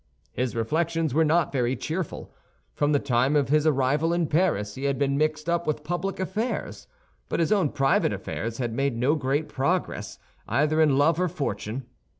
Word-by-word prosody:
His 125 -1 -2
reflections 160 +5 0
were 160 +3 +4
not 160 +2 +2
very 125 -2 0
cheerful. 160 +7 -5 0.4
From 145 0 +1
the 145 - +4
time 130 +1 +1
of 140 -3 +2
his 155 +1 +3
arrival 145 +3 +2
in 170 -1 +1
Paris, 150 - +1
he 135 +4 -5
had 140 -1 +1
been 140 0 +1
mixed 155 +1 0
up 170 -1 0
with 155 -1 -1
public 175 +5 -3
affairs; 210 +6 -3 0.4
but - - -1
his 165 +4 +1
own 195 -8 +3
private 135 -1 +2
affairs 115 0 -4
had 120 -3 -2
made 135 -1 0
no 130 +5 +2
great 145 0 0
progress, 135 - -2 0.3
either 150 +7 +2
in 145 -4 +4
love 155 +4 +3
or 180 - +2
fortune. 135 - -4
150 Hz, 180 wpm, -26 LUFS, 135-165 Hz, 0.4 s, were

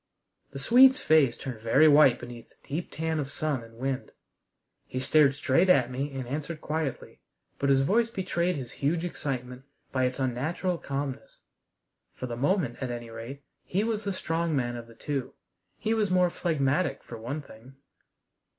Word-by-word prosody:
The - - -9
Swede's 255 - +6
face 150 - +4
turned 125 -5 -7
very 135 +7 +5
white 145 -4 +6
beneath 120 -1 -10
the - - -28
deep 160 +5 -3
tan 160 0 -2
of 140 -2 -3
sun 145 -5 -2
and 115 0 -15
wind. 135 +1 -3 0.8
He 130 - -4
stared 140 +1 +4
straight 145 +6 +2
at 130 -8 +4
me 135 +3 -3
and 130 -2 -4
answered 155 +4 -4
quietly, 150 -4 -4 0.4
but 140 - +1
his 135 -1 +5
voice 225 +11 +2
betrayed 180 -4 -1
his 130 -5 -6
huge 165 +5 -1
excitement 125 -6 -4 0.3
by 130 -1 +1
its 125 0 -2
unnatural 150 +8 -1
calmness. 140 -1 -5 0.7
For - - -5
the 120 -2 -4
moment, 140 - 0
at 130 - -2
any 120 -1 -6
rate, 120 +5 -8 0.2
he 195 +3 -1
was 220 -1 -1
the 200 - -1
strong 165 -3 -1
man 120 -3 -1
of 120 -1 -8
the 115 - -16
two. 140 +1 -4 0.4
He 220 - 0
was 215 -3 +1
more 180 -1 +3
phlegmatic, 145 -2 0
for 115 - -9
one 140 +7 -4
thing. 125 +2 -15
140 Hz, 175 wpm, -28 LUFS, 125-170 Hz, 0.8 s, Swede's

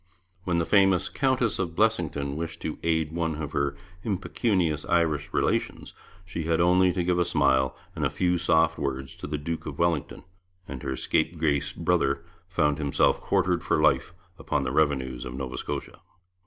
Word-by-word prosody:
When 90 -2 +1
the 85 - +1
famous 95 -2 +4
Countess 130 -5 +1
of 85 -4 -2
Blessington 80 -10 +1
wished 80 +1 -5
to 80 - -4
aid 80 -2 0
one 80 -1 -1
of 75 -2 -5
her 70 0 0 0.3
impecunious 95 - 0
Irish 80 -3 +1
relations, - - -1 0.3
she 85 -3 -5
had 80 0 +1
only 90 +1 +4
to 90 0 -1
give 90 0 +1
a - - +4
smile 65 -5 +2 0.2
and - - -3
a - - +2
few 90 -1 0
soft 80 -1 +2
words 65 -1 -3
to - - -7
the 75 0 -2
Duke 80 +3 -4
of 75 -2 -6
Wellington, 85 -5 -1 0.4
and 65 -3 -7
her 65 - -3
scape 80 +5 0
grace 75 -3 +1
brother 70 +4 0 0.2
found 75 -5 +1
himself 70 -2 +2
quartered - - +1
for - - +1
life - - +3 0.3
upon - - -1
the 65 - -2
revenues 65 -4 0
of 60 - -6
Nova 65 -1 -5
Scotia. - - -5
80 Hz, 175 wpm, -26 LUFS, 70-90 Hz, 0.4 s, famous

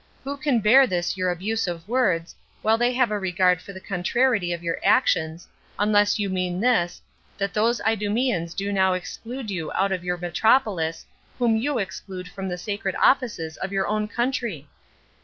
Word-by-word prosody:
Who 280 +1 -4
can 270 -4 +1
bear 255 +6 +6
this 175 -3 -1
your 185 -1 0
abuse 200 +5 -1
of 170 0 -5
words, 195 -9 +1 0.3
while 220 +1 +4
they 240 +1 +3
have 250 -3 +2
a 210 - 0
regard 180 -1 +2
to 200 - -11
the 190 - -9
contrariety 195 +2 0
of 170 0 -4
your 170 -1 -2
actions, 160 +2 +2 0.3
unless 205 0 +3
you 205 -1 -1
mean 185 -1 -2
this, 200 -7 +1 0.4
that 200 0 -2
those 230 +3 +2
Idumeans 210 -4 0
do 200 +1 -2
now 190 -1 +3
exclude 225 +6 -6
you 165 -5 -4
out 195 +1 +1
of 185 -2 -2
your 180 0 -1
metropolis, 175 -2 +1 0.3
whom 235 -3 +2
you 265 +5 0
exclude 190 -2 -5
from 195 -1 -6
the 180 -1 -3
sacred 195 0 -3
offices 210 -12 +1
of 190 - -4
your 195 -1 0
own 215 0 0
country? 235 - -2
200 Hz, 175 wpm, -24 LUFS, 180-225 Hz, 0.4 s, bear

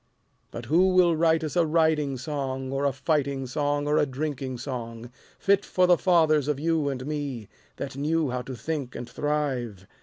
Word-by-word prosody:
But 120 - -7
who 170 +9 +4
will 175 -2 +5
write 160 0 +3
us 155 - -4
a 175 - +4
riding 155 -4 +1
song 135 -1 -4
Or 135 +1 -1
a 140 - +3
fighting 140 -1 -1
song 145 +2 -1
or 150 +1 +3
a 150 - +2
drinking 135 -1 -4
song, 120 -2 -6 0.3
Fit 200 0 +2
for 185 - +2
the 180 0 +6
fathers 160 -5 +3
of 150 -2 0
you 160 -2 +1
and 130 -2 -4
me, 140 -7 -4 0.3
That 135 - -6
knew 150 0 0
how 125 0 -2
to 130 +1 -7
think 135 +2 -4
and 120 - -6
thrive? 130 -11 -2
145 Hz, 185 wpm, -26 LUFS, 130-160 Hz, 0.3 s, the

